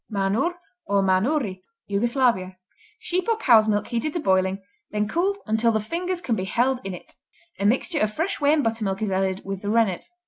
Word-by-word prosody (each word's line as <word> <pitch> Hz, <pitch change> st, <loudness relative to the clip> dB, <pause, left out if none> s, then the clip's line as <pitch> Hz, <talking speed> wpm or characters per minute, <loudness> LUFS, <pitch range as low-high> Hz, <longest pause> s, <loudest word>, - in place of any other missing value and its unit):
Manur, 210 Hz, -, 0 dB, 0.3 s
or 200 Hz, -1 st, +2 dB
Manuri 195 Hz, +1 st, +1 dB, 0.2 s
Yugoslavia 205 Hz, -3 st, +1 dB, 0.4 s
Sheep 365 Hz, +4 st, -2 dB
or 455 Hz, -, +2 dB
cow's 230 Hz, -, +5 dB
milk 205 Hz, -1 st, +1 dB
heated 260 Hz, +6 st, -2 dB
to 345 Hz, -, -1 dB
boiling, 190 Hz, -, +1 dB, 0.3 s
then 210 Hz, 0 st, -1 dB
cooled 375 Hz, -, 0 dB
"until 220 Hz, +1 st, +2 dB
the 220 Hz, -, +1 dB
fingers 345 Hz, -, -3 dB
can 240 Hz, -9 st, 0 dB
be 185 Hz, -, -3 dB
held 245 Hz, +7 st, +1 dB
in 195 Hz, -2 st, -4 dB
it". -, -, -13 dB, 0.5 s
A 200 Hz, -, +2 dB
mixture 270 Hz, -, +1 dB
of 215 Hz, -, +1 dB
fresh 325 Hz, -, -2 dB
whey 285 Hz, 0 st, +4 dB
and 305 Hz, -2 st, +3 dB
buttermilk 220 Hz, -3 st, -1 dB
is 205 Hz, -, -1 dB
added 190 Hz, 0 st, -1 dB
with 195 Hz, -1 st, -4 dB
the 205 Hz, -, -3 dB
rennet. 220 Hz, -5 st, +1 dB
220 Hz, 195 wpm, -24 LUFS, 195-285 Hz, 0.5 s, cow's